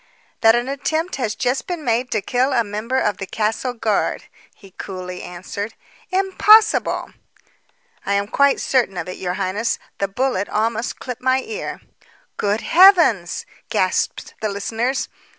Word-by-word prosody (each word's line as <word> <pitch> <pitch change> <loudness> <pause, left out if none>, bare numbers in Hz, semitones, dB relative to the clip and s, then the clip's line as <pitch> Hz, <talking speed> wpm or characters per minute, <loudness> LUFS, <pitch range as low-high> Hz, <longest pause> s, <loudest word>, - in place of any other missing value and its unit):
"That 225 +1 +6
an 240 +1 -1
attempt 315 +5 -2
has 225 -5 -2
just 255 +1 -1
been 345 -5 -4
made 240 +2 +1
to 215 -3 -1
kill 255 +5 +1
a 235 -2 +3
member 215 +5 -3
of 210 -6 +1
the 195 - -6
castle 225 +5 -1
guard," 220 -3 0 0.3
he 195 -2 -17
coolly 180 -1 -7
answered. 200 +5 -6 0.3
"Impossible!" 405 +3 +4 0.9
"I 200 - -1
am 200 0 +1
quite 280 +5 +3
certain 240 -8 +1
of 175 - -4
it, 185 - -6
your 180 -1 -3
highness. 205 +6 -1 0.2
The 200 - +1
bullet 205 -1 -1
almost 225 +2 -1
clipped 250 -1 -7
my 260 +1 +2
ear." 445 +2 -6 0.6
"Good 205 +2 0
heavens!" 335 - +5 0.2
gasped - - -1
the 215 - 0
listeners. 225 +6 -2
230 Hz, 150 wpm, -20 LUFS, 200-265 Hz, 0.9 s, That